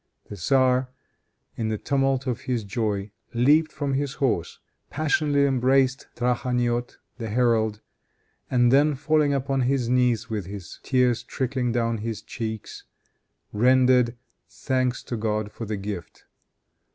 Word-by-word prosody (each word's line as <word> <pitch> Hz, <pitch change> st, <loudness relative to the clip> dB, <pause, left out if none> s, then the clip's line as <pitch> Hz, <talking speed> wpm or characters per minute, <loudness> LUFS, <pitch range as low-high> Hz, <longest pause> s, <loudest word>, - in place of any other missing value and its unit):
The -, -, -5 dB
tzar, 130 Hz, +6 st, +2 dB, 0.7 s
in 110 Hz, -2 st, -2 dB
the 110 Hz, -, -1 dB
tumult 135 Hz, +1 st, 0 dB
of 125 Hz, -4 st, -2 dB
his 120 Hz, -3 st, 0 dB
joy, 100 Hz, -1 st, -2 dB, 0.2 s
leaped 150 Hz, +7 st, +4 dB
from 145 Hz, -3 st, -2 dB
his 135 Hz, 0 st, -1 dB
horse, 115 Hz, -11 st, -1 dB, 0.3 s
passionately 145 Hz, -1 st, +1 dB
embraced 130 Hz, 0 st, +2 dB
Trakhaniot, 120 Hz, 0 st, -1 dB, 0.2 s
the 115 Hz, -2 st, -4 dB
herald, 110 Hz, -2 st, +1 dB, 0.7 s
and 120 Hz, -1 st, +3 dB
then 145 Hz, +2 st, +4 dB
falling 150 Hz, +1 st, +2 dB
upon 135 Hz, -1 st, 0 dB
his 125 Hz, -1 st, +1 dB
knees 125 Hz, -2 st, +2 dB
with 105 Hz, -6 st, -4 dB, 0.3 s
tears 125 Hz, -3 st, +2 dB
trickling 125 Hz, 0 st, -2 dB
down 115 Hz, -1 st, 0 dB
his 110 Hz, 0 st, -4 dB
cheeks, 110 Hz, -2 st, -6 dB, 0.7 s
rendered 125 Hz, +1 st, +4 dB, 0.3 s
thanks 130 Hz, -2 st, -1 dB
to 120 Hz, -, -4 dB
God 110 Hz, -1 st, -2 dB
for 115 Hz, -, -7 dB
the 105 Hz, -1 st, -2 dB
gift. 100 Hz, -4 st, -7 dB
125 Hz, 125 wpm, -25 LUFS, 115-135 Hz, 0.7 s, leaped